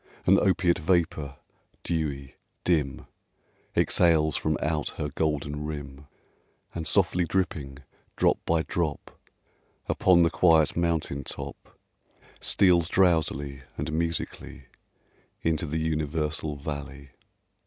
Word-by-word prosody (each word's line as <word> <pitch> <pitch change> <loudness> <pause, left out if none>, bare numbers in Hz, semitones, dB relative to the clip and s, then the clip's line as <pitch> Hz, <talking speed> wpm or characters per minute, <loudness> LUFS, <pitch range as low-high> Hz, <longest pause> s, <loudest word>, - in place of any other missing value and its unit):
An 95 +2 +6
opiate 90 -3 +2
vapor, 80 -4 0 0.5
dewy, 70 -5 -3 0.3
dim, 75 -7 0 0.7
Exhales 80 -3 +3
from 80 -1 0
out 75 -1 -1
her 75 - -2
golden 75 0 -2
rim, 70 -2 -7 0.7
And, 80 -1 -4
softly 90 -2 +3
dripping, 75 -7 -2 0.3
drop - - +2
by 80 -1 +1
drop, 80 -4 -3 0.8
Upon 90 -2 +4
the 85 - +2
quiet 80 -4 +4
mountain 80 -5 -1
top, - - -7 0.6
Steals 90 -4 +4
drowsily 75 -7 +1 0.2
and 80 - -3
musically 85 0 -3 0.8
Into 80 -1 0
the 80 +2 -2
universal 75 -1 -2
valley. 70 -1 -7
80 Hz, 100 wpm, -27 LUFS, 70-85 Hz, 0.8 s, An